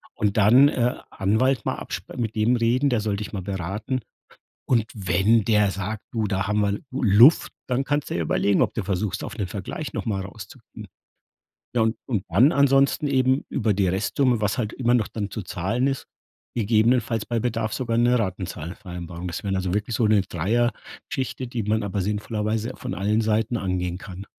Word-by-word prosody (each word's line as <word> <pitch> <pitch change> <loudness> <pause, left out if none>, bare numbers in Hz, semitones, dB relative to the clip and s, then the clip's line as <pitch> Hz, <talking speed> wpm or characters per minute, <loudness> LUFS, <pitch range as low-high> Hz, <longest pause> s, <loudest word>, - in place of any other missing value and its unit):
Und 105 0 0
dann, 120 +7 +6
äh, 125 -2 0 0.2
Anwalt 110 +5 +1
mal - - 0
absp - - -7
mit 115 -3 -2
dem 110 +3 +3
reden. 125 +4 +2
Der 120 -4 +1
soll 105 -2 -1
dich 105 - -6
mal 100 - -3
beraten. 100 +7 -3 0.7
Und 115 -4 +3
wenn 100 +3 +2
der 105 -2 +3
sagt: 100 +2 -4
„Du, 115 -2 -1
da 100 -1 -1
haben 105 +1 +1
wir 100 -1 +2 0.2
Lu 130 - -4
Luft,“ 115 +8 +6 0.2
dann 130 +2 0
kannst 145 0 -1
du - - -2
ja 85 - -1
überlegen, 100 +5 +2
ob - - 0
du 115 - -2
versuchst, 95 +1 -2
auf - - -7
'ne 100 - -1
Vergleich 100 - -6
noch - - -4
mal 100 -3 -1
rauszukommen. 100 +1 -11 0.9
Na, 120 - +3
und 110 0 +1
und 110 -8 -1
dann 115 - +5
ansonsten 140 +1 +3
eben 130 0 +2
über 110 -3 0
die 95 -1 +1
Restsumme, 110 +6 +1
was 105 +2 0
halt 110 -4 -1
immer 120 -2 +1
noch 115 -4 +2
dann 105 -3 -4
zu 110 - -5
zahlen 100 +9 -1
ist, 135 -1 -2 0.5
gegebenenfalls 115 +1 +2
bei 120 - -1
Bedarf 115 -2 -1
sogar 120 -3 -1
'ne 120 +1 +4
Ratenzahlungsvereinbarung. 90 -2 -5
Das 85 - -5
wären 95 -1 -1
dann 95 - 0
so 90 0 -2
wirklich 105 +3 -2
so 110 - +2
'ne 105 -2 +4
Dreiergeschichte, 115 +6 -2
die 120 -2 -3
man 110 +2 +1
aber 100 0 -2
sinnvollerweise 105 +3 -2
von 125 - -5
allen 105 +3 +1
Seiten 110 +2 0
angehen 90 -3 -2
kann. 95 +1 -9
110 Hz, 190 wpm, -24 LUFS, 100-120 Hz, 0.9 s, dann